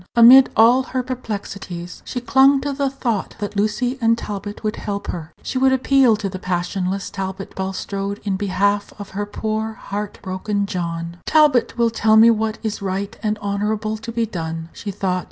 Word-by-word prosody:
Amid 250 +3 +9
all 235 +4 +6
her 260 -1 -3
perplexities, 200 -8 -6
she 245 - -4
clung 270 +3 +5
to 285 +1 -2
the 275 0 0
thought 235 -6 -2
that 205 0 -5
Lucy 230 +6 0
and 230 0 +3
Talbot 205 -1 -6
would 215 +1 -2
help 200 -1 -4
her. 160 -2 -5
She 260 - -2
would 265 0 +4
appeal 265 -2 +4
to 210 -1 -3
passionless 185 +2 -2
Talbot 190 0 -5
Bulstrode 195 +1 -4
in 200 -2 -1
behalf 200 +1 0
of 205 -1 -9
her 205 +1 -3
poor 220 +1 -3
heart 205 -1 -5
broken 200 +2 -2
John. 170 -3 -4
"Talbot 300 -7 +4
will 235 -1 +3
tell 220 -1 +3
me 230 +1 +8
what 220 0 -1
is 220 -1 -3
right 195 +3 -3
and 215 -1 -1
honorable 210 +2 -1
to 225 +2 -7
be 230 0 0
done," 165 -5 -5
she 210 - -7
thought. 185 -2 -1
210 Hz, 175 wpm, -21 LUFS, 195-230 Hz, -, Amid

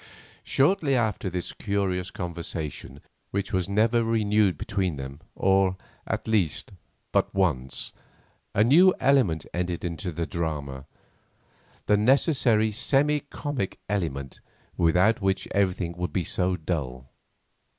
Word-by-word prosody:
Shortly 140 -1 +2
after 110 -5 0
this 90 0 -4
curious 95 -3 -1
conversation, 80 -5 -6 0.3
which 100 -1 -3
was 95 0 0
never 115 +3 +3
renewed 105 -5 +2
between 95 -2 -1
them, 70 +2 -7
or, 95 -1 +2 0.3
at - - -3
least, 100 -9 0 0.4
but - - +2
once, 75 -10 -1 0.6
a 105 - +5
new 175 +10 +6
element 110 - +3
entered 90 0 -2
into 85 +2 -4
the 85 +1 -3
drama, 70 -6 -4 1.0
the 105 - +4
necessary 120 -2 +3
semi 145 +7 +2
comic 140 -8 -4
element 75 -10 -3 0.3
without 90 +7 +3
which 95 -1 0
everything 90 -3 0
would 90 0 -2
be 90 - 0
so 90 +3 0
dull. 65 -7 -4
95 Hz, 120 wpm, -26 LUFS, 85-110 Hz, 1.0 s, new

